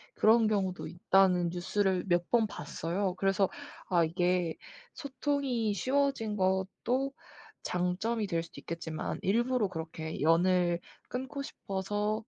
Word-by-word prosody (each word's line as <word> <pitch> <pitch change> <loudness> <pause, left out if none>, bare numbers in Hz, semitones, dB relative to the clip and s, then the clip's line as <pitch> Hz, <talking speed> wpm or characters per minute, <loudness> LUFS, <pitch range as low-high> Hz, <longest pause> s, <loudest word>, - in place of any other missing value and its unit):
"그런 225 0 +5
경우도 195 -3 -1
있다."는 180 -1 +3
뉴스를 185 +1 0
몇 175 -1 +1
번 235 -2 +4
봤어요. 180 +4 -3
그래서 195 0 +2 0.4
아 175 -2 +4
이게 175 0 +1 0.4
소통이 265 -5 -1
쉬워진 255 -1 0
것도 190 +8 0 0.5
장점이 195 +5 -1
될 165 -2 0
수도 - - -12
있겠지만 165 -1 -4
일부러 235 +2 +2
그렇게 160 -3 -6
연을 175 +2 +3 0.3
끊고 265 +3 -4
싶어서 205 -3 -2
190 Hz, 260 characters per minute, -31 LUFS, 175-225 Hz, 0.5 s, 그런